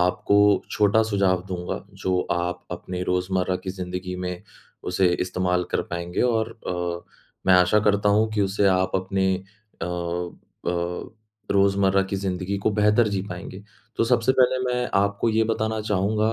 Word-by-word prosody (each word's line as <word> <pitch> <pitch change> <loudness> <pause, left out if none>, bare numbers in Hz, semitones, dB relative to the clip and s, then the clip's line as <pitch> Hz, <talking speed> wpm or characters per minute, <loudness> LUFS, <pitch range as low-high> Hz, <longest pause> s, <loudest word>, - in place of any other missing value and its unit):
आपको 90 +3 +2 0.3
छोटा 105 +1 +3
सुझाव 100 -4 +1
दूँगा, 90 -1 -4
जो 95 -2 -1
आप 85 0 -2
अपने 90 0 -5
रोजमर्रा 90 0 0
की 95 - -6
ज़िंदगी 90 0 -5
में 90 0 -5 0.5
उसे 95 0 +3
इस्तेमाल 90 0 0
कर - - 0
पाएँगे, 85 0 -3
और 115 -2 +1 0.2
अ, 85 -1 -3 0.4
मैं 95 - +7
आशा 90 +4 +5
करता 105 -1 +2
हूँ 110 +2 +3
कि 105 - 0
उससे 100 +1 +1
आप 95 0 +2
अपने 95 0 0 0.5
अ - - +1 0.8
अ, 85 0 -2 0.4
रोजमर्रा 100 0 +3
की 95 +1 -3
ज़िंदगी 95 0 -2
को 100 - +1
बेहतर 105 +2 +3
जी 100 - 0
पाएँगे। 95 +2 -8 0.3
तो - - +2
सबसे 120 +1 +3
पहले 130 0 +3
मैं 125 0 -1
आपको 100 +3 +1
ये 110 0 +2
बताना 110 0 -1
चाहूँगा 105 +2 0
95 Hz, 155 wpm, -24 LUFS, 90-105 Hz, 0.8 s, मैं